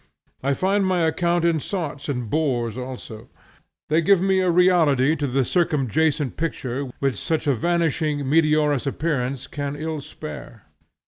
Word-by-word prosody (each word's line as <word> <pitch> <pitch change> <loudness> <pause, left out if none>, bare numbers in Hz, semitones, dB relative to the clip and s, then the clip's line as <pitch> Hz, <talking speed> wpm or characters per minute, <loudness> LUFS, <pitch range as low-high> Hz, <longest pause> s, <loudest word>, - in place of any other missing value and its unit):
I 140 +1 0
find 195 +4 +1
my 185 -2 +1
account 170 +1 +1
in 165 -2 +2
sots 150 -4 -4
and 125 -4 -2
bores 120 -5 0
also. 125 -3 -8 0.6
They 155 +2 +2
give 190 +1 +3
a 190 -1 +2
reality 165 -6 +4
to 145 -2 -2
the 135 +1 +1
circumjacent 150 - 0
picture 140 -4 -3
which 135 -2 -1
such 160 -1 -1
a 145 - +3
vanishing 155 0 0
meteorous 150 -2 +2
appearance 135 -3 -2
can 145 -1 -4
ill 155 0 -4
spare. - - -9
150 Hz, 140 wpm, -23 LUFS, 135-170 Hz, 0.6 s, reality